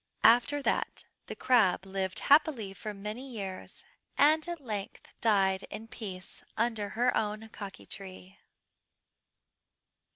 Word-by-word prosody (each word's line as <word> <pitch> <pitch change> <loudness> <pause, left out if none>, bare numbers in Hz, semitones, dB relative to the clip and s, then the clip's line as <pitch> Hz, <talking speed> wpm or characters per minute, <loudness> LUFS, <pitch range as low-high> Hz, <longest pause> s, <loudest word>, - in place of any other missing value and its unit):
"After 260 +5 +5
that - - 0 0.2
the - - -5
crab 215 -8 +3
lived 190 -1 -3
happily 280 -9 +3
for 215 +2 -6
many 210 +6 -6
years, 195 -6 -7 0.3
and 310 +3 +5
at 345 -1 -4
length 210 -7 -6
died 195 -4 +3
in 220 +2 -7
peace 190 -5 -7
under 220 -3 0
her 245 +1 +3
own 215 +1 -2
kaki 200 -3 -9
tree. 190 -1 -8
215 Hz, 120 wpm, -30 LUFS, 195-245 Hz, 0.3 s, After